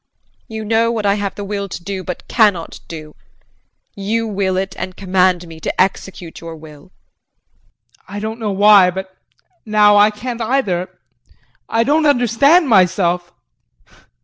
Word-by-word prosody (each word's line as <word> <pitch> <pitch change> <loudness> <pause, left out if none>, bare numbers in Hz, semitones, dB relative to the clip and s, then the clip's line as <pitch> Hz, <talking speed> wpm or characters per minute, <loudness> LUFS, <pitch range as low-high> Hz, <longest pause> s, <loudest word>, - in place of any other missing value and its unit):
You 220 -1 -6
know 225 +2 +2
what 220 -3 -3
I 200 - +3
have 205 -1 -3
the 205 - -6
will 200 0 -4
to 175 - -7
do 190 0 -5
but 180 - -7
cannot 205 -8 +1
do. 155 -2 -9 0.8
You 220 +3 -2
will 195 -3 -1
it 190 +1 -3
and 185 -1 -6
command 185 -2 +1
me 160 -1 -11
to - - -5
execute 185 -2 -2
your 165 -1 -8
will. 150 -2 -14
JEAN. 185 - -40
I - - -3
don't 220 +2 -5
know 215 -2 -2
why 200 -1 +6
but 190 +1 -7 0.5
now 210 -1 +4
I 205 +1 +6
can't 235 +3 -6
either. 220 -7 -1 0.8
I 225 0 +2
don't 305 +4 +2
understand 280 - +4
myself. 180 -4 +2
200 Hz, 150 wpm, -17 LUFS, 185-220 Hz, 0.8 s, why